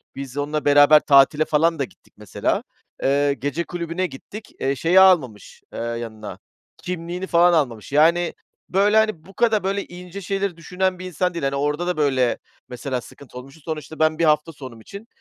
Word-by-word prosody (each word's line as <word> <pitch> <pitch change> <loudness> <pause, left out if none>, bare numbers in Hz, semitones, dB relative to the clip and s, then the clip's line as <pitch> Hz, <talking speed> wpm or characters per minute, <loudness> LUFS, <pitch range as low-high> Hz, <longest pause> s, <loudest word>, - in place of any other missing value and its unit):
biz 135 -1 -8
onunla 150 +1 -2
beraber 145 +1 +7
tatile 145 +2 +4
falan 160 +1 +1
da - - +1
gittik 130 - -14
mesela. - - -2 0.4
Eee, 140 +1 +2
gece 145 +4 -3
kulübüne 170 +1 -3
gittik. 210 +9 -11
Eee, 135 +1 0
şeyi 165 +8 +3
almamış, 155 - +2
eee, - - -6
yanına 115 -2 -6 0.4
kimliğini 180 +1 -5
falan 175 0 +4
almamış. 125 -10 -1
Yani 165 +4 +3 0.4
böyle, 205 +3 +3
hani, 215 -8 +1
bu 195 - -15
kadar 220 0 +1
böyle 195 +1 -2
ince 180 +2 -10
şeyleri 195 -1 -3
düşünen 180 +2 -2
bir 185 - -7
insan 180 +1 -2
değil. 170 -3 -5
Hani, 135 0 -1
orada 150 +5 -1
da 180 - -1
böyle 130 -5 +1 0.3
mesela 125 +1 -4
sıkıntı 125 +1 -14
olmuştu. 135 +5 -12
Sonuçta 155 -1 -6
ben 155 0 +2
bir - - +2
hafta 150 +1 +2
sonum 130 -7 -11
için, 200 - -11
155 Hz, 180 wpm, -22 LUFS, 140-180 Hz, 0.4 s, beraber